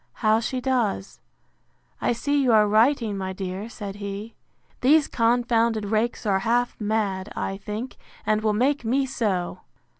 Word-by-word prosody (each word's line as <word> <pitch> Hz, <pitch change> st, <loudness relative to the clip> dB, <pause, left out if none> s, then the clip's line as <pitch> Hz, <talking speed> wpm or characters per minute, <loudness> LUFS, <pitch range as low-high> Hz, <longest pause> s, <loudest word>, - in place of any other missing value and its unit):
how 215 Hz, +1 st, +5 dB
she 255 Hz, +3 st, -2 dB
does? 245 Hz, -7 st, -1 dB, 0.8 s
I -, -, +2 dB
see 285 Hz, +5 st, +1 dB
you 255 Hz, -3 st, +3 dB
are 210 Hz, -1 st, +5 dB
writing, 225 Hz, 0 st, +3 dB
my 190 Hz, -1 st, -3 dB
dear, 190 Hz, +3 st, -5 dB
said 205 Hz, -3 st, -7 dB
he. 200 Hz, +2 st, -6 dB, 0.5 s
These 290 Hz, +4 st, +4 dB
confounded 230 Hz, -2 st, +1 dB
rakes 220 Hz, +3 st, -1 dB
are 195 Hz, -2 st, +2 dB
half 240 Hz, +4 st, +1 dB
mad, 205 Hz, -2 st, -1 dB
I 195 Hz, -, -3 dB
think, 210 Hz, +5 st, -6 dB, 0.3 s
and 215 Hz, 0 st, +2 dB
will 215 Hz, -1 st, +2 dB
make 260 Hz, +5 st, +1 dB
me 265 Hz, +4 st, +1 dB
so! 210 Hz, -9 st, -2 dB
220 Hz, 150 wpm, -24 LUFS, 205-245 Hz, 0.8 s, how